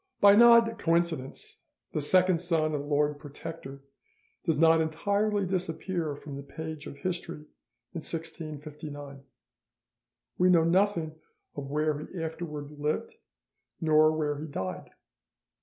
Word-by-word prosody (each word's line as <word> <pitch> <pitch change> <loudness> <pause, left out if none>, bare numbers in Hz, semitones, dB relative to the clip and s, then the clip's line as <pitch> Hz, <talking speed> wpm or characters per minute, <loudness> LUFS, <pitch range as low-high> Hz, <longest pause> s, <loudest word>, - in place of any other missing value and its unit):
By 200 0 +8
an 210 - +7
odd 235 -1 +6
coincidence 165 -6 -1 0.3
the 155 - 0
second 185 +3 +4
son 160 -3 0
of 145 - -1
the 145 - -8
Lord 145 0 +1
Protector 140 -1 -9 0.6
does 165 - +2
entirely 180 +6 +2
disappear 175 -3 -2
from 145 0 -9
the - - -6
page 155 +1 -7
of 140 - -9
history 170 -2 -4 0.5
in 170 - -4
1659; 150 -3 -7 1.2
we 180 +1 +5
know 170 -2 +5
nothing 170 -3 +1 0.4
of 140 -1 -6
where 150 0 0
he 170 +4 -8
afterwards 160 -3 -5
lived 155 - -2 0.7
nor 155 -1 +5
when 150 -1 -2
he - - -12
died. 95 -7 -4
160 Hz, 125 wpm, -29 LUFS, 150-175 Hz, 1.2 s, By